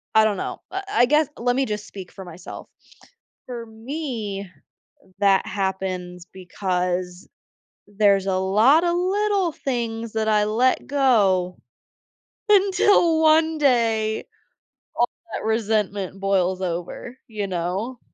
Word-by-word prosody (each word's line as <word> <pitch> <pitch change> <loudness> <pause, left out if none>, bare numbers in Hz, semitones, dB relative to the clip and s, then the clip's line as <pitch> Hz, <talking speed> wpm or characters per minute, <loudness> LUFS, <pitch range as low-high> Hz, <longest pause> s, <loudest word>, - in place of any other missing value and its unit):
I 220 - +7
don't 215 -2 +1
know, - - -5
I 380 +1 -3
I 325 -11 +4
guess, 300 +3 +3
let 245 +1 0
me 270 +1 +1
just 210 -2 -4
speak 190 -4 -10
for 190 - -10
myself. 175 +1 -10 0.8
For 240 -2 -6
me, 225 - -5 0.7
that 195 -1 +3
happens 185 -2 -3
because 180 -1 -3 0.6
there's 200 -1 +2
a 190 - +1
lot 215 - +4
of 345 0 +1
little 390 0 +1
things 230 -5 -3
that 220 0 -1
I 210 -1 +3
let 235 +5 +1
go. 205 -10 +2 0.9
Until 385 -4 +4
one 320 0 +4
day, 225 -6 +1 0.7
all 240 - +2 0.2
that - - -4
resentment 210 -4 -1
boils 190 -1 0
over, 180 +8 -5
you 210 -3 -4
know. 190 +8 -3
215 Hz, 120 wpm, -23 LUFS, 190-260 Hz, 0.9 s, I